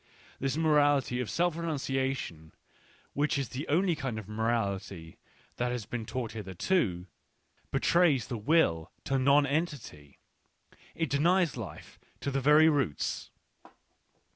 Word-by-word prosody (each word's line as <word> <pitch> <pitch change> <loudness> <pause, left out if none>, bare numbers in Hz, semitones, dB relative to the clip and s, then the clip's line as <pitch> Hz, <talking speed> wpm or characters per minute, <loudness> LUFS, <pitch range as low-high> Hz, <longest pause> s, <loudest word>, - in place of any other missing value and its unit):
This 135 +2 -1
morality 145 -5 +3
of 125 - -4
self 175 -1 +1
renunciation, 135 - -3 0.6
which 145 +1 +1
is 135 -4 -2
the 135 +4 -5
only 175 +3 +2
kind 135 -7 -4
of 110 -3 -7
morality 100 -6 -2 0.4
that 125 0 0
has 120 -4 -4
been 115 -1 -5
taught 120 0 -3
hitherto, 95 - -1 0.7
be - - +1
trays 160 -9 +3
the 120 - -5
will 105 - +2
to 135 0 0
nonentity 140 - 0 0.4
— - - -46 0.3
it 165 -5 -2
denies 170 +4 +2
life 115 -7 -9 0.2
to 140 - -2
the 135 0 -1
very 150 +3 +6
roots. 140 - 0
135 Hz, 130 wpm, -30 LUFS, 110-150 Hz, 0.7 s, very